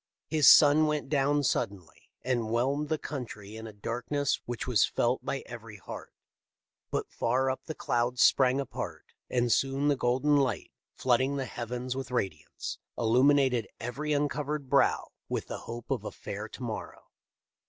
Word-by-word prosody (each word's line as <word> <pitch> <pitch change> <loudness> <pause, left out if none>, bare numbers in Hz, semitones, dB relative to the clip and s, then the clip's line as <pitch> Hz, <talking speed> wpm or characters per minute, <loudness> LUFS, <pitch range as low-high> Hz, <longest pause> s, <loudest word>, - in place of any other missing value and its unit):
His 155 -3 +7
sun 155 +1 +7
went 150 -2 -1
down 145 0 +2
suddenly, 100 - -2
and 120 -3 0
whelmed 135 +6 0
the 155 - +1
country 115 -9 -7
in 110 0 -7
a - - -8
darkness 125 +7 -2
which 120 -1 -4
was 125 -5 +3
felt 120 +2 +1
by 135 - -3
every 115 -3 -9
heart; 95 - -9 0.8
but - - -2
far 130 +3 +1
up 130 - -6
the 155 - -5
clouds 120 +1 +1
sprang 130 0 +4
apart, 135 -3 -5 0.2
and 120 -1 +1
soon 135 +3 +2
the 145 - +3
golden 130 +4 +2
light, 135 -2 0 0.2
flooding 130 +2 +2
the 135 -1 -2
heavens 125 +1 -4
with 135 -2 -4
radiance, 120 -7 -3 0.2
illuminated 125 +1 +3
every 135 +6 -3
uncovered 145 -1 -1
brow - - +3 0.2
with - - -2
the - - -6
hope 120 0 -6
of - - 0
a - - -5
fair - - -6
to - - -9
morrow. - - -6
130 Hz, 160 wpm, -29 LUFS, 120-145 Hz, 0.8 s, His